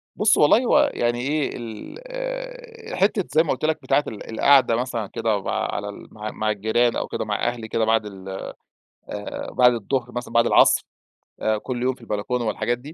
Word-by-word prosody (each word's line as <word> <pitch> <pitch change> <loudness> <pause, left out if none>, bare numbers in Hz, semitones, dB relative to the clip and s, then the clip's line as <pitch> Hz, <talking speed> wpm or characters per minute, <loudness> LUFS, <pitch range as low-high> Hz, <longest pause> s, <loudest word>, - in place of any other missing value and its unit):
بُصّ، 210 0 +4
والله 150 - +6
هو 295 +4 +4
يعني 120 0 0
إيه، 145 +3 0
ال - - -7
حتة 195 +1 +2
زي 160 - +4
ما 165 - -1
قلت 130 - -2
لك، 160 0 +1
بتاعة 145 - +2
ال 105 - -8
القعدة 130 +1 +5
مثلًا 115 -3 -2
كده 105 0 -1
مع - - -3 0.2
على 100 0 -3
ال 100 - -10
مع 110 0 -5
مع 110 0 -1
الجيران 110 +3 +1
أو - - -2
كده - - -3
مع 105 +2 -1
أهلي 120 -2 -3
كده، 110 0 0
بعد 110 -1 +2
ال 95 -2 -9 0.8
آآ 105 0 -6
بعد 125 -1 +5
الضهر 120 +2 -2
مثلًا، 120 -1 -5
بعد 115 - +5
العصر، - - +5 0.6
آآ 110 0 +1
كل 120 +3 -4
يوم 130 +1 +2
في - - -22
البلكونة 115 +2 -2
والحاجات 120 +3 -1
دي، 140 +6 -11
120 Hz, 195 wpm, -23 LUFS, 110-155 Hz, 0.8 s, والله